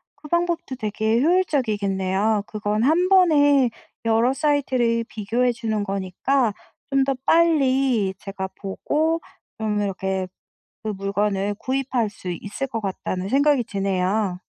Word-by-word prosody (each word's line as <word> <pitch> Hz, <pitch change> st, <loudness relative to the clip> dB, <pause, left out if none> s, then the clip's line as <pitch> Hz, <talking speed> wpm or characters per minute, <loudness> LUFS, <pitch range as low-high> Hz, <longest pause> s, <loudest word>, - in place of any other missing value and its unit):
그 290 Hz, +1 st, -13 dB
방법도 340 Hz, -3 st, -1 dB
되게 220 Hz, 0 st, 0 dB
효율적이겠네요. 215 Hz, -, +1 dB
그건 210 Hz, 0 st, -1 dB
1 325 Hz, +7 st, +3 dB
번에 290 Hz, -8 st, +5 dB, 0.4 s
여러 230 Hz, +3 st, +3 dB
사이트를 255 Hz, -5 st, +1 dB
비교해 235 Hz, +3 st, 0 dB
주는 225 Hz, -3 st, -2 dB
거니까 200 Hz, +6 st, 0 dB, 0.4 s
좀 275 Hz, 0 st, +3 dB
더 275 Hz, -, +1 dB
빨리 270 Hz, -, +3 dB
제가 195 Hz, -1 st, -5 dB
보고 310 Hz, +11 st, -1 dB, 0.4 s
좀 215 Hz, -1 st, -1 dB
이렇게 190 Hz, -1 st, -2 dB, 0.6 s
그 220 Hz, -, -3 dB
물건을 200 Hz, 0 st, -1 dB
구입할 260 Hz, -4 st, -1 dB
수 190 Hz, -2 st, -8 dB
있을 205 Hz, +9 st, -5 dB
것 230 Hz, -4 st, -4 dB
같다는 190 Hz, -1 st, -3 dB
생각이 280 Hz, 0 st, +3 dB
드네요. 195 Hz, -1 st, -1 dB
225 Hz, 260 characters per minute, -23 LUFS, 200-275 Hz, 0.6 s, 번에